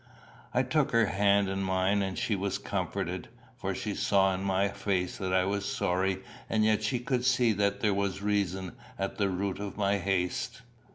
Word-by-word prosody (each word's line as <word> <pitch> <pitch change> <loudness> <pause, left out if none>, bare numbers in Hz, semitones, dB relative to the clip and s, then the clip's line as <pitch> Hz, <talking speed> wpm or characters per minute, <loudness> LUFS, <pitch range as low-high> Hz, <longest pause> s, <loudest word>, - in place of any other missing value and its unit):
I 125 +3 +2
took 140 +1 +1
her 115 -1 +5
hand 100 0 +3
in 95 0 -2
mine, 95 +1 +1
and 95 -1 -2
she 105 - 0
was 100 0 -1
comforted, - - -3 0.3
for - - -3
she - - -3
saw 95 -1 +3
in 95 +1 -3
my 100 0 +2
face 95 -2 -2
that 95 -1 -2
I 95 0 +3
was 100 +1 -1
sorry, 95 +1 0 0.3
and 110 -1 +2
yet 110 -1 +3
she 110 +4 0
could 125 +1 -1
see 125 -3 +3
that 100 0 0
there 105 -2 +3
was 100 -1 -1
reason 95 -3 0 0.3
at 95 +2 -3
the 100 -1 +2
root 95 +1 -2
of 100 -1 -5
my 100 -1 +2
haste. 95 +5 -1
100 Hz, 190 wpm, -29 LUFS, 95-105 Hz, 0.3 s, her